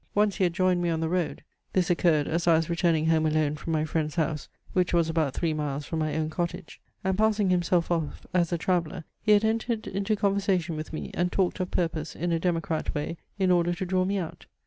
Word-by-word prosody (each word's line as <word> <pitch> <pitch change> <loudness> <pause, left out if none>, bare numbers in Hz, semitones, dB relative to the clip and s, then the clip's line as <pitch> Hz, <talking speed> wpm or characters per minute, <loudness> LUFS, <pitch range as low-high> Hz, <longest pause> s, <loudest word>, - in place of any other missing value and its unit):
Once 205 -1 +2
he 190 - +3
had 175 - 0
joined 185 0 +2
me 175 - +1
on 165 -1 0
the 160 - 0
road; 175 -1 -1 0.3
(this 180 -2 +2
occurred, 165 -4 +3
as 170 +2 -1
I 165 - +7
was 165 +1 0
returning 170 -2 +2
home 160 -1 +3
alone 155 -1 +1
from 160 +2 -5
my 155 -1 +1
friend's 155 0 -2
house, 155 -3 -1 0.2
which 180 -1 +2
was 165 -1 +3
about 160 -4 0
three 165 -2 0
miles 145 -1 -3
from 160 +2 -3
my 155 -1 -1
own 155 0 -1
cottage,) 175 +1 -4 0.2
and, 190 0 +1
passing 210 -2 +2
himself 175 -1 +1
off 165 -4 -2
as 175 -2 +2
a 170 - +1
traveller, 175 -1 -1 0.2
he 215 - +4
had 210 +1 +4
entered 225 0 -1
into 200 +3 -1
conversation 195 -4 +1
with 155 0 -6
me, 155 - -5
and 180 +1 0
talked 190 -1 0
of 185 -1 -1
purpose 165 -2 -2
in 175 +2 -2
a 165 - +1
democrat 165 -1 -1
way 150 +3 -2 0.2
in 190 -2 +2
order 175 0 +2
to 190 +1 -3
draw 185 0 +1
me 195 +2 0
out. 170 -4 -6
170 Hz, 235 wpm, -27 LUFS, 160-185 Hz, 0.3 s, I